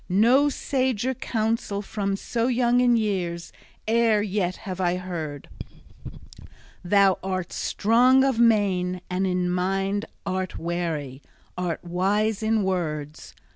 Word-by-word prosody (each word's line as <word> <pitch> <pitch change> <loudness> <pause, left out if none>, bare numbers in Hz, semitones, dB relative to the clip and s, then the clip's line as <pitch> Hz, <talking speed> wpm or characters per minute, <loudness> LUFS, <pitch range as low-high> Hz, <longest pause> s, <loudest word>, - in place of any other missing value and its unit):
No 240 +10 +4
sager 260 -3 -1
counsel 220 -3 -2
from 200 -1 -2
so 230 +4 -2
young 245 -1 +2
in 245 -1 +4
years 180 -6 -2 0.3
e'er 225 -2 +3
yet 190 -3 -1
have 190 -1 -4
I 175 -1 +1
heard. 165 -6 -6 1.4
Thou 195 +1 +3
art 185 -2 -3
strong 250 +5 +3
of 265 -4 +1
main 190 -6 +2
and 190 +1 0
in 180 -1 0
mind 195 +3 -1 0.2
art 185 -1 -3
wary, 160 -6 -3 0.3
art 180 -2 -3
wise 195 +5 0
in 220 -1 +1
words! 155 -5 -3
195 Hz, 120 wpm, -24 LUFS, 180-225 Hz, 1.4 s, No